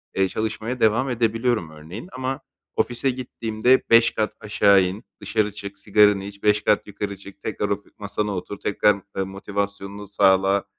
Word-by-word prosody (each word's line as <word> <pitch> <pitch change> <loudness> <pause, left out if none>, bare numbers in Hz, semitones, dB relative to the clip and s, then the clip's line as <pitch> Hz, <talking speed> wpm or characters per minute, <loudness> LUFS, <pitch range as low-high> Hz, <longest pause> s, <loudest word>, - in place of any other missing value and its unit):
eee, 95 0 +3
çalışmaya 110 +4 -3
devam 115 +5 +3
edebiliyorum 115 -5 0
örneğin. 85 - -9
Ama 130 +2 -3 0.3
ofise 125 +2 0
gittiğimde 125 -1 +1
5 115 0 +6
kat 110 0 -1
aşağı 100 -2 +4
in, 95 +6 -4 0.2
dışarı 105 -2 0
çık, 100 -1 -8
sigaranı 105 -1 +4
iç, 100 0 -10
5 105 0 +3
kat 105 - +2
yukarı 100 -1 -5
çık, 100 +1 -14
tekrar, 105 -1 -2
of 100 0 -2
masana 105 0 -3
otur, 95 +2 -6
tekrar, 100 0 +2 0.2
eee, 95 - +1
motivasyonunu 100 +1 -5
sağla, 95 0 +3
105 Hz, 155 wpm, -23 LUFS, 100-110 Hz, 0.3 s, 5